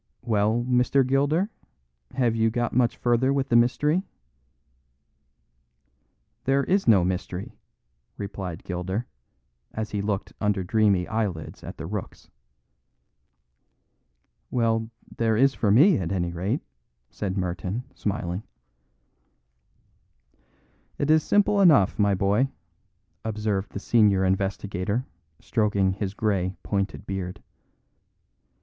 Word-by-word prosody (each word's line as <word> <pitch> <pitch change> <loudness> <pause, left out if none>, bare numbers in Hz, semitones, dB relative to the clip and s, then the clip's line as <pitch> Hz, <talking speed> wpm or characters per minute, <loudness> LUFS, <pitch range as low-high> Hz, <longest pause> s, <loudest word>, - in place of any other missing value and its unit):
"Well, 110 +1 +1
Mr. 125 +2 +3
Gilder, 145 - +1 0.6
have 120 -3 +2
you 115 0 +2
got 120 +1 -1
much 120 -1 +2
farther 120 +2 +2
with 140 -1 0
the 120 - +2
mystery?" 150 +8 +3 2.4
"There 135 +1 +2
is 195 +5 +1
no 100 -6 +6
mystery," 90 0 -3 0.7
replied 95 -4 -6
Gilder, 95 +6 -3 0.7
as 110 0 -4
he 105 - -1
looked 100 -1 -3
under 105 -2 +1
dreamy 100 -2 +2
eyelids 100 -8 -3
at - - -8
the 80 - -6
rooks. 100 +2 -7 2.2
"Well, 115 -2 0 0.3
there 110 -2 +2
is 135 +3 +4
for 110 - 0
me, 145 - +6
at 85 -3 -3
any 85 -3 -1
rate," 95 - -2 0.5
said 100 -1 -3
Merton, 90 +5 -3
smiling. 95 -2 -3 2.6
"It 145 +2 +1
is 155 0 +5
simple 205 +2 +3
enough, 140 - +5
my 100 -1 +3
boy," 100 +8 +2 0.7
observed 105 -3 -2
the - - -5
senior 105 -4 +3
investigator, 95 +3 -1 0.3
stroking 100 -3 +1
his 100 0 -4
grey, 95 -4 0
pointed 100 0 -2
beard. 95 -2 -5
105 Hz, 110 wpm, -25 LUFS, 95-120 Hz, 2.6 s, no